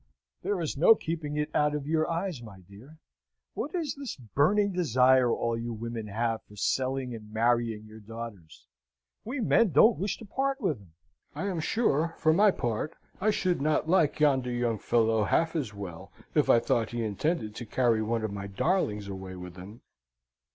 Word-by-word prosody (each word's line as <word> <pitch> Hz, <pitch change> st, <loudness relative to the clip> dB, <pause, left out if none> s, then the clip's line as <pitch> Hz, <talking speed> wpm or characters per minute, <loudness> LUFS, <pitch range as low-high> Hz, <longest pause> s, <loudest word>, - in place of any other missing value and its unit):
"There 205 Hz, -2 st, -1 dB
is 160 Hz, -4 st, -3 dB
no 175 Hz, +9 st, +7 dB
keeping 155 Hz, -5 st, -4 dB
it 150 Hz, 0 st, -1 dB
out 150 Hz, 0 st, +2 dB
of 145 Hz, -2 st, -4 dB
your 155 Hz, +1 st, +1 dB
eyes, 170 Hz, -4 st, -2 dB
my 100 Hz, -5 st, -12 dB
dear. 105 Hz, -, -15 dB, 0.6 s
What 295 Hz, +8 st, -4 dB
is 320 Hz, -5 st, -1 dB
this 275 Hz, -3 st, -6 dB
burning 145 Hz, -, +1 dB
desire 130 Hz, -6 st, +4 dB
all 115 Hz, 0 st, 0 dB
you 115 Hz, +1 st, -4 dB
women 115 Hz, 0 st, -5 dB
have 115 Hz, +2 st, -1 dB
for 105 Hz, -, -17 dB
selling 130 Hz, +3 st, -1 dB
and 105 Hz, -2 st, -10 dB
marrying 115 Hz, -1 st, +1 dB
your 110 Hz, +1 st, -12 dB
daughters? 110 Hz, -6 st, -9 dB, 0.6 s
We 255 Hz, +4 st, -4 dB
men 225 Hz, 0 st, +4 dB
don't 225 Hz, +1 st, +6 dB
wish 200 Hz, +2 st, -1 dB
to 225 Hz, -, -11 dB
part 270 Hz, +6 st, -1 dB
with 185 Hz, -, 0 dB
'em. 85 Hz, -5 st, -20 dB, 0.4 s
I -, -, -3 dB
am 185 Hz, -4 st, -2 dB
sure, 165 Hz, -, +1 dB
for 160 Hz, -, +3 dB
my 205 Hz, +5 st, +5 dB
part, 120 Hz, -, -2 dB, 0.2 s
I 210 Hz, +3 st, +2 dB
should 185 Hz, -7 st, 0 dB
not 155 Hz, +1 st, +1 dB
like 165 Hz, -4 st, +3 dB
yonder 135 Hz, -4 st, +3 dB
young 120 Hz, -3 st, -1 dB
fellow 110 Hz, -1 st, +2 dB
half 165 Hz, -, +1 dB
as 140 Hz, -10 st, -2 dB
well 100 Hz, -5 st, -8 dB, 0.2 s
if -, -, +2 dB
I 115 Hz, -, +7 dB
thought 115 Hz, -1 st, 0 dB
he 120 Hz, -1 st, -1 dB
intended 110 Hz, -, -1 dB
to 120 Hz, -, -7 dB
carry 115 Hz, -2 st, +2 dB
one 115 Hz, +1 st, -1 dB
of 110 Hz, -2 st, -3 dB
my 100 Hz, 0 st, -5 dB
darlings 105 Hz, -, 0 dB
away 95 Hz, -1 st, -7 dB
with 90 Hz, -1 st, -9 dB
him." 100 Hz, +6 st, -11 dB
125 Hz, 185 wpm, -28 LUFS, 110-165 Hz, 0.6 s, no